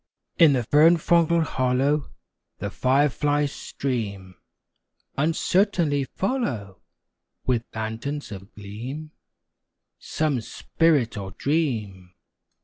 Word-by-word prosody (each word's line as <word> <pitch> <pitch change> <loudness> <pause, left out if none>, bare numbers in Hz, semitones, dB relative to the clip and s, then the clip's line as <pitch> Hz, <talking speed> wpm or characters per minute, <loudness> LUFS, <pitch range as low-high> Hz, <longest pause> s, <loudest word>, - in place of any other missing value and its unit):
In 160 -4 +7
the 125 -2 +1
fern 155 +8 +5
fronded 170 0 +3
hollow 135 +1 0 0.5
The - - -4
fireflies 145 +2 +1
stream, 100 -12 -4 0.8
Uncertainly 165 -1 +1
follow, 125 - -3 0.6
With 120 -2 0
lanterns 110 +7 -4
of 95 0 -9
gleam, 120 +10 -7 0.9
Some 150 -6 -1
spirit 145 -2 +1
or 95 -1 -7
dream. 105 - -2
140 Hz, 85 wpm, -24 LUFS, 110-155 Hz, 0.9 s, In